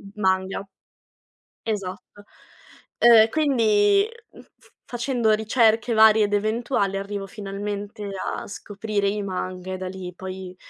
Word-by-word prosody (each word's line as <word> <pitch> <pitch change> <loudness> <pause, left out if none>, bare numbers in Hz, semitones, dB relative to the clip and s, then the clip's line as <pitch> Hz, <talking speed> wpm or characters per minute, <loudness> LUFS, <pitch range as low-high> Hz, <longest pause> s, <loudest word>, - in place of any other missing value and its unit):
manga. 190 -1 0 1.0
Esatto. 205 -1 -5 0.8
Uhm, 230 -2 +7
quindi, 235 - +3 0.3
mhmm, - - -13 0.2
f - - -23
facendo 240 -2 0
ricerche 225 +1 +2
varie 220 -1 +6
ed 205 - -2
eventuali 215 -1 0
arrivo 200 0 -4
finalmente 205 0 -6 0.2
a - - -4
scoprire 205 0 -3
i 210 +1 -2
manga 185 -1 -5
e - - -3
da 185 0 -5
lì 185 -1 -8
poi, 185 0 -8
205 Hz, 120 wpm, -23 LUFS, 195-220 Hz, 1.0 s, Uhm